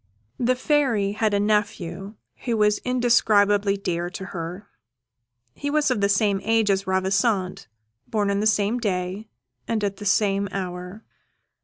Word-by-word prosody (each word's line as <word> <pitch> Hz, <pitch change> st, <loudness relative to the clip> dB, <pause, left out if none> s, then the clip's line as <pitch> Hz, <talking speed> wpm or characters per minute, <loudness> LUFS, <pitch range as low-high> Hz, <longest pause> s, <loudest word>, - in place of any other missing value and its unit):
The 250 Hz, +1 st, +2 dB
Fairy 250 Hz, -7 st, +1 dB
had 215 Hz, +1 st, 0 dB
a -, -, +2 dB
nephew 205 Hz, -2 st, -1 dB, 0.3 s
who 235 Hz, -3 st, 0 dB
was 210 Hz, 0 st, +3 dB
indescribably 210 Hz, -5 st, +3 dB
dear 175 Hz, -3 st, -2 dB
to 190 Hz, +1 st, -7 dB
her: 175 Hz, +3 st, -6 dB, 0.9 s
he 285 Hz, -, -4 dB
was 295 Hz, -2 st, +2 dB
of 210 Hz, -, 0 dB
the 200 Hz, -, +2 dB
same 200 Hz, -1 st, +2 dB
age 225 Hz, -2 st, +2 dB
as 195 Hz, 0 st, -1 dB
Ravissante, 190 Hz, +1 st, 0 dB, 0.4 s
born 205 Hz, -2 st, 0 dB
on 200 Hz, -, 0 dB
the 215 Hz, -, +2 dB
same 215 Hz, +2 st, +1 dB
day 190 Hz, -1 st, -3 dB, 0.4 s
and 220 Hz, -2 st, -1 dB
at 200 Hz, -1 st, -2 dB
the 205 Hz, -, -8 dB
same 200 Hz, 0 st, +2 dB
hour. 180 Hz, +2 st, -6 dB
205 Hz, 150 wpm, -24 LUFS, 195-220 Hz, 0.9 s, was